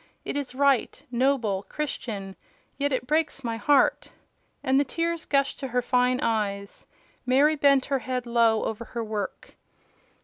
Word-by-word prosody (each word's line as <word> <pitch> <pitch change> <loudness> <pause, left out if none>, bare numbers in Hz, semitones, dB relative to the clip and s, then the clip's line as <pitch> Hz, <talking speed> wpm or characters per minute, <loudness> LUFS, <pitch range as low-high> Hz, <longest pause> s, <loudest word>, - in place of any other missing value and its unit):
It - - -3
is 280 -3 -4
right, 275 -2 +2
noble, 240 -6 +1
Christian: 215 -10 -4 0.4
yet 285 +1 +1
it 255 -1 -1
breaks 305 -1 0
my 230 -1 -2
heart!" 280 +5 +2 0.5
And 265 +1 +3
the - - +4
tears 335 +4 -2
gushed 275 -1 +1
to 270 - -4
her 250 0 0
fine 250 0 +2
eyes. 200 -3 -2 0.4
Mary 275 +5 +4
bent 280 -2 +4
her 275 -2 0
head 250 0 -3
low 230 -2 +3
over 220 +1 -3
her 235 0 -5
work. 210 -3 -5
255 Hz, 150 wpm, -26 LUFS, 230-280 Hz, 0.5 s, the